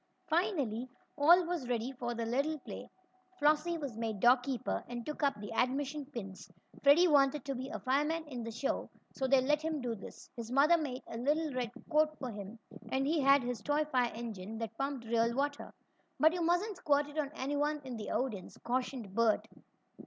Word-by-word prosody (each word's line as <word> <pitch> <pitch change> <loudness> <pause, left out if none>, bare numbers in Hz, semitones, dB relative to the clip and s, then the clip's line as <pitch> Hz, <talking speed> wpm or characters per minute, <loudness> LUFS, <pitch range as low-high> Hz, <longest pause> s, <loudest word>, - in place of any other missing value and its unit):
Finally 305 - 0 0.3
all 340 +5 +6
was 335 -8 -3
ready 240 +1 -1
for 240 -2 -4
the 230 0 -2
little 280 +7 0
play. - - -8 0.5
Flossie 305 +3 +2
was 280 -7 -5
made 220 -3 -2
door 245 +5 +7
keeper 250 0 -3
and 240 -1 -6
took 300 - -5
up 280 -7 +1
the 205 +1 -6
admission 275 +4 0
pins. 195 -9 -8 0.3
Freddie 295 +6 +7
wanted 280 -3 +3
to 275 - -2
be 260 +1 -5
a - - -4
fireman 300 +5 0
in 255 -5 -6
the 230 - -4
show, 235 +5 -2 0.2
so 265 - -1
they 270 0 +5
let 295 +3 +2
him 315 -1 -2
do 245 -3 -2
this. 200 - -10
His 230 -2 -6
mother 285 +6 +6
made 280 -6 -3
a 230 - -7
little 295 +3 +1
red 250 -2 -1 0.2
coat 310 0 +3
for 255 -3 -5
him, 205 +1 -8 0.3
and 265 +1 +1
he 310 +1 +2
had 275 0 +5
his 245 -1 -3
toy 295 +1 +1
fire 250 -2 +2
engine 220 -2 -6
that 225 -1 -5
pumped 275 -2 -3
real 230 +1 +1
water. 285 +2 -2 0.5
"But 315 +2 +6
you 355 - -2
mustn't 355 +5 +1
squirt 290 -4 +2
it 295 +1 -5
on 285 -2 -1
anyone 290 +2 0
in 255 -2 -6
the 215 -2 -5
audience," 230 -8 -3
cautioned 250 -4 -2
Bert. 230 0 +2
270 Hz, 195 wpm, -33 LUFS, 235-300 Hz, 0.5 s, door